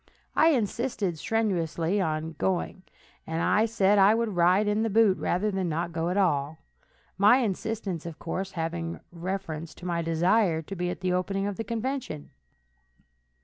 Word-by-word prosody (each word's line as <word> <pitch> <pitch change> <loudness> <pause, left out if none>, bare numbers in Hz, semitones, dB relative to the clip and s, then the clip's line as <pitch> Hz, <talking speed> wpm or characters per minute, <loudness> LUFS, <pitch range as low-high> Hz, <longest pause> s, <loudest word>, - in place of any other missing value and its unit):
I 320 - +5
insisted 230 - 0
strenuously 185 -3 0
on 160 -2 -2
going, 185 0 -1 0.5
and 190 +7 +2
said 205 -2 +3
I 200 +3 +6
would 230 -1 0
ride 180 +4 +4
in 210 +1 +1
the 225 - +1
boot 210 -2 +4
rather 205 +4 0
than 190 -3 -1
not 170 +2 -2
go 165 +1 -1
at 180 - -1
all, 155 -5 +1 0.6
my 210 +5 +7
insistence, 205 - -2
of 165 - -7
course, 190 +3 -4
having 165 0 -3
reference 170 -2 -5
to 180 - -11
my 170 -1 -1
desire 165 +1 +2
to 195 - -7
be 180 0 -2
at 180 - -5
the 185 -1 0
opening 195 +2 -1
of 205 -1 -2
the 225 - -2
convention. 230 - -4
185 Hz, 160 wpm, -27 LUFS, 165-210 Hz, 0.6 s, my